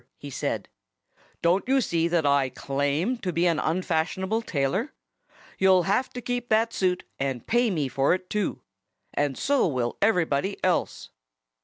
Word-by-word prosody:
he 145 - -9
said. - - -3 0.8
"Don't 175 +3 +3
you 270 0 +4
see 170 -9 +1
that 170 -2 +1
I 140 -2 +3
claim 145 - -1
to 185 -5 -2
be 170 +1 +1
an 165 -3 +2
unfashionable 185 +6 0
tailor? 180 - -1 0.7
You'll 190 -1 +5
have 200 +9 +1
to 245 - -5
keep 245 0 -3
that 225 +1 +2
suit, 180 -1 0 0.2
and 135 -3 -2
pay 240 0 +2
me 155 -8 0
for 135 +5 +2
it, 185 0 -8
too. 210 -1 -2 0.5
And 145 -2 0
so 280 -4 +2
will 125 -6 -2
everybody 185 -3 +1
else." 180 -2 -1
180 Hz, 155 wpm, -26 LUFS, 145-215 Hz, 0.8 s, You'll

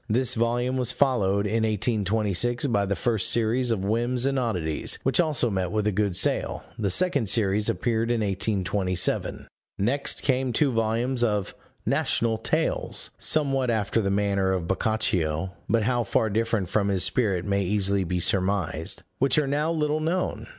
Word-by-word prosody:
This 125 +4 +1
volume 120 +2 0
was 125 -3 -1
followed, 100 -8 +1
in 110 +2 0
1826, 110 +2 0
by 100 -7 +1
the 100 - 0
first 110 -4 +2
series 120 +2 +1
of 100 -4 -1
Whims 120 +4 0
and 135 -1 +1
Oddities, 90 -11 -1
which 135 -1 +2
also 150 -8 +1
met 95 -2 -1
with 105 -1 -1
a 105 - +2
good 100 -2 -1
sale; - - 0 0.2
the 100 -3 0
second 140 - +2
series 105 0 +2
appeared 115 0 -1
in 120 -2 0
1827. 95 -2 -1 0.3
Next 130 +8 +1
came 130 -2 0
two 140 +3 +2
volumes 115 +2 0
of 105 -4 -1 0.3
National 115 -1 0
Tales, - - -2
somewhat 135 -4 +1
after 110 0 0
the 100 - -1
manner 100 -1 +1
of 90 -3 -3
Boccaccio 95 -5 -1 0.2
(but 115 +1 +2
how 120 +2 +1
far 110 +1 0
different 115 -2 0
from 100 +2 0
his 95 -2 +1
spirit 95 -2 0
may 100 -1 0
easily 100 0 +1
be 90 0 -2
surmised), 95 -3 0 0.2
which 135 +2 +2
are 150 - +3
now 145 +4 0
little 155 -1 0
known. 170 +4 -2
110 Hz, 165 wpm, -25 LUFS, 100-125 Hz, 0.3 s, are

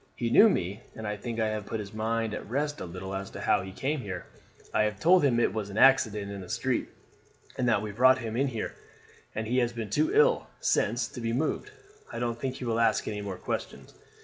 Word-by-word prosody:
He 115 -1 -2
knew 225 - +8
me, 100 - -2
and 110 -1 -6
I 105 - -2
think 115 +2 -5
I 110 -1 +2
have 105 -1 -4
put 110 - -3
his 100 -1 -7
mind 110 0 -1
at 105 - -6
rest 145 +4 -1
a - - -3
little 95 +2 -6
as 95 0 -4
to - - -8
how - - +3
he 95 +1 -7
came 140 +9 -2
here. 95 -7 -6 0.5
I - - +3
have 105 -2 -2
told 180 +4 +5
him 125 -4 +3
it - - +2
was 105 -2 -3
an 100 - -7
accident 105 -7 +4
in 100 -1 -6
the 90 - -10
street, - - -1 0.7
and 125 -1 +1
that 110 -3 +2
we 105 - -4
brought 130 +5 +5
him 115 -3 -5
in 135 +3 +2
here, 115 -5 -4 0.6
and 110 - -2
he 125 +3 +1
has 120 -1 +1
been 115 -3 -5
too 315 +3 +2
ill 455 +3 +4
since 120 - +1
to 125 - -8
be 115 0 -1
moved. 155 - -1 0.4
I - - -6
don't 120 -1 -2
think 130 -1 -3
he 130 - -6
will 115 -1 0
ask 115 - +2
any 105 -1 -3
more 100 -2 -5
questions. - - -5
115 Hz, 245 wpm, -28 LUFS, 105-130 Hz, 0.7 s, knew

